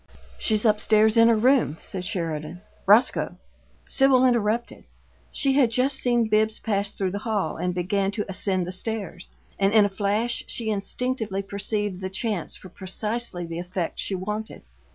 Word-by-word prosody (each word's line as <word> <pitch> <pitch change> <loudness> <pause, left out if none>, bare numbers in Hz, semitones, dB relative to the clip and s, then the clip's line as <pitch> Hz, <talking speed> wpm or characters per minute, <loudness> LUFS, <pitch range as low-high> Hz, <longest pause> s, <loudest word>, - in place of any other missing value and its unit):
"She's 215 0 0
up 210 -1 +4
stairs 215 0 +4
in 230 0 +6
her 230 -1 +4
room," 245 - +3
said 185 -2 -6
Sheridan. 165 -1 -3 0.3
"Roscoe 220 +6 +4 0.3
" - - -34
Sibyl 265 -2 +5
interrupted. 235 -1 0 0.5
She 275 -2 +1
had 265 -4 +4
just 255 +4 +1
seen 240 -3 +2
Bibbs 215 +1 +2
pass 200 -2 -1
through 190 -2 -2
the 200 - -3
hall 205 -8 -2
and 180 0 -2
begin 195 +2 0
to 210 -1 -2
ascend 190 -1 0
the 180 - -5
stairs; 190 -2 -4 0.3
and 195 0 +3
in 215 -2 +6
a - - 0
flash 205 +4 -1
she 220 -2 -3
instinctively 215 -1 -2
perceived 200 -1 -2
the 190 - -3
chance 200 -2 -2
for 185 - -11
precisely 195 +1 -3
the 165 0 -5
effect 180 -1 -4
she 195 - -1
wanted. 210 +4 -5
210 Hz, 170 wpm, -25 LUFS, 190-230 Hz, 0.5 s, in